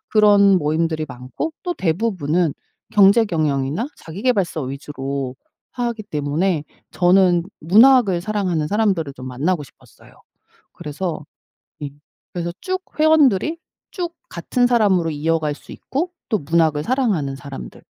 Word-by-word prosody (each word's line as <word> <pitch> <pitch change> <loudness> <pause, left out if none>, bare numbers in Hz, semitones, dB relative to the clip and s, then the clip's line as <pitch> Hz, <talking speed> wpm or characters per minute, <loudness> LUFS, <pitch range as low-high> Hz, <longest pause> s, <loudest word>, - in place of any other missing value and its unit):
그런 200 -3 +6
모임들이 155 +1 0
많고 125 - -5
또 355 -1 -2
대부분은 175 - 0 0.4
경제 205 +3 +6
경영이나 155 - -1
자기계발서 190 -2 -1
위주로 135 -1 -5 0.4
하기 235 -3 -3
때문에 150 +2 -1 0.3
저는 180 -1 +4 0.2
문학을 210 - +5
사랑하는 185 -7 -1
사람들을 195 -8 0
좀 130 -2 -10
만나고 150 +6 -1
싶었어요. - - -19 0.6
그래서 160 -1 -5 0.6
예 145 - -3 0.4
그래서 170 -1 -3
쭉 370 0 -3 0.2
회원들이 310 - +4 0.3
쭉 345 -2 -4 0.2
같은 245 +8 0
사람으로 200 -8 +3
이어갈 155 0 -1
수 - - -16
있고 335 +7 -3 0.2
또 215 - +2
문학을 155 -1 +1
사랑하는 205 - 0
사람들 100 - -9
175 Hz, 300 characters per minute, -20 LUFS, 150-215 Hz, 0.6 s, 그런